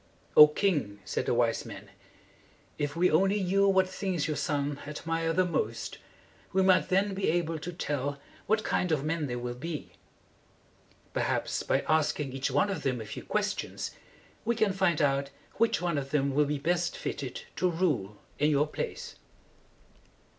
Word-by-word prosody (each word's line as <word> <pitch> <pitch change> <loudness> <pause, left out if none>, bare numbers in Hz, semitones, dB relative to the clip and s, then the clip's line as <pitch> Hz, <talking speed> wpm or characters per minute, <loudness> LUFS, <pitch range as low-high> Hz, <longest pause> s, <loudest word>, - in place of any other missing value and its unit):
"O 150 - +11
king!" 150 - 0
said - - -2
the - - +2
wise - - +2
men, - - -10 0.9
"if 145 +1 -1
we 180 +2 +3
only 195 +5 +3
knew 195 +2 +3
what 190 -1 +4
things 185 -4 -2
your 155 - -1
sons 145 -1 -1
admire 165 +2 -2
the 185 +3 +2
most, 115 -9 -2 0.5
we 190 0 +3
might 185 -1 +4
then 195 +2 +2
be 190 0 0
able 165 -1 0
to 175 +4 -5
tell 145 -4 -3 0.3
what 215 +1 +2
kind 180 - 0
of 145 -3 +1
men 155 -1 -1
they 120 - -3
will 120 0 -3
be. 150 +5 -6 1.2
Perhaps, - - 0
by - - +1
asking 150 -3 +1
each 135 +1 -1
one 145 +10 +2
of 180 -6 -3
them 130 -4 -1
a 110 - -6
few 110 - -7
ques - - 0
tions, - - -5 0.5
we 235 +1 +1
can 215 -3 +2
find 180 -5 +2
out 140 0 +1 0.3
which 230 -5 +2
one 170 -5 +1
of 135 -1 -6
them 140 -1 +1
will 150 +2 +4
be 145 +1 -1
best 170 +4 0
fitted 130 -3 -5
to 180 - +2
rule 145 - 0 0.2
in 150 +1 +4
your 145 0 +3
place." 150 - -5
155 Hz, 175 wpm, -29 LUFS, 140-185 Hz, 1.2 s, O